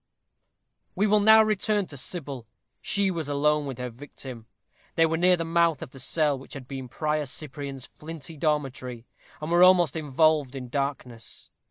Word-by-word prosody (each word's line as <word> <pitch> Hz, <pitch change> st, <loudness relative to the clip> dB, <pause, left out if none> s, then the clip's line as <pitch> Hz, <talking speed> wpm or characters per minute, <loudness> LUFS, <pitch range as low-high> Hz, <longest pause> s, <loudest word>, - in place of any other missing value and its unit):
We 205 Hz, -, +2 dB
will 210 Hz, 0 st, +4 dB
now 220 Hz, +1 st, +7 dB
return 215 Hz, -1 st, +1 dB
to 150 Hz, -, -10 dB
Sybil. 135 Hz, -4 st, -4 dB, 0.3 s
She 200 Hz, -2 st, +1 dB
was 165 Hz, -5 st, -4 dB
alone 150 Hz, +1 st, +2 dB
with 130 Hz, -3 st, -5 dB
her 125 Hz, -1 st, -4 dB
victim. 125 Hz, -2 st, -10 dB, 0.5 s
They 165 Hz, -, +5 dB
were 160 Hz, 0 st, 0 dB
near 180 Hz, +2 st, +4 dB
the 165 Hz, -, -2 dB
mouth 165 Hz, -2 st, +2 dB
of -, -, -10 dB
the 135 Hz, -, -11 dB
cell 145 Hz, +1 st, +1 dB
which 135 Hz, -, -11 dB
had 130 Hz, -3 st, -8 dB
been 135 Hz, -1 st, -6 dB
Prior 150 Hz, +1 st, -1 dB
Cyprian's 135 Hz, -1 st, -5 dB
flinty 160 Hz, -1 st, -9 dB
dormitory, 135 Hz, -6 st, -2 dB, 0.3 s
and 155 Hz, +2 st, -5 dB
were 175 Hz, +1 st, +4 dB
almost 180 Hz, -4 st, +6 dB
involved 150 Hz, -2 st, +2 dB
in 125 Hz, -2 st, -6 dB
darkness. 130 Hz, -4 st, -4 dB
150 Hz, 170 wpm, -26 LUFS, 135-165 Hz, 0.5 s, now